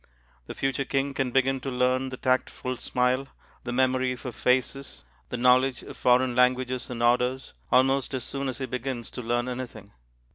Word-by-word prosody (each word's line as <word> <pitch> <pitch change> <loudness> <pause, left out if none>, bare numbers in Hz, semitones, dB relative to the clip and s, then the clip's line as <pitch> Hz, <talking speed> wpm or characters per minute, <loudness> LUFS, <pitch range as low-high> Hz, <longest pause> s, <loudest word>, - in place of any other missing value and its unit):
The - - -7
future 135 0 -1
King 135 +1 -1
can 135 -2 -1
begin 135 +1 +2
to 135 - -5
learn 130 +1 +1
the 130 - -7
"tactful 130 0 -1
smile," 125 +3 0 0.4
the 120 - -3
"memory 130 0 +1
for 125 +1 -7
faces," 130 +3 -1 0.3
the 125 - -3
knowledge 125 +1 +3
of - - -9
foreign 125 0 +3
languages 125 0 +2
and 120 -1 -3
orders, 125 +2 +1 0.2
almost 135 +1 +3
as 130 - -3
soon 140 +1 -3
as 130 - -4
he 135 - -3
begins 125 -1 -4
to - - -6
learn 120 +1 -1
anything. 120 -5 -6
130 Hz, 175 wpm, -27 LUFS, 125-130 Hz, 0.4 s, knowledge